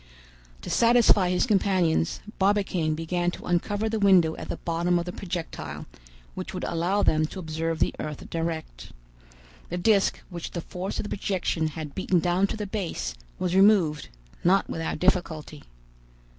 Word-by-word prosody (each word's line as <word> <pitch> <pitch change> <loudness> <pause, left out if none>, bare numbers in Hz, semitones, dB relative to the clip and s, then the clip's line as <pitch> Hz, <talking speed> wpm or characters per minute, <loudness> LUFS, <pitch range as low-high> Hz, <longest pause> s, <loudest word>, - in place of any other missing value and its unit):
To - - -6
satisfy 230 -5 +5
his 180 +4 +2
companions, 185 -7 +1 0.2
Barbicane 190 -5 +1
began 175 +2 -1
to - - -7
uncover 205 +5 0
the 220 0 -1
window 185 -5 +5
at - - -8
the - - -3
bottom 170 +1 0
of 170 - -2
the 180 - -4
projectile, 165 - -5 0.5
which - - -6
would - - -4
allow 180 +5 0
them 155 0 +3
to - - -10
observe 165 -1 -2
the - - +1
earth 150 -2 -5
direct. 160 - -4 0.8
The 175 - -3
disc, 200 +2 +3
which 170 -2 -5
the 170 - -3
force 180 +3 -5
of - - -2
the 205 - -6
projection 180 -5 -1
had 155 -1 -6
beaten 185 -1 +1
down 180 +4 +2
to 220 - -4
the 210 - -3
base, 195 - -3 0.2
was 180 -1 -1
removed, 190 -7 +4 0.3
not 190 +3 +3
without 165 0 -3
difficulty. 160 -5 0
175 Hz, 160 wpm, -26 LUFS, 160-195 Hz, 0.8 s, satisfy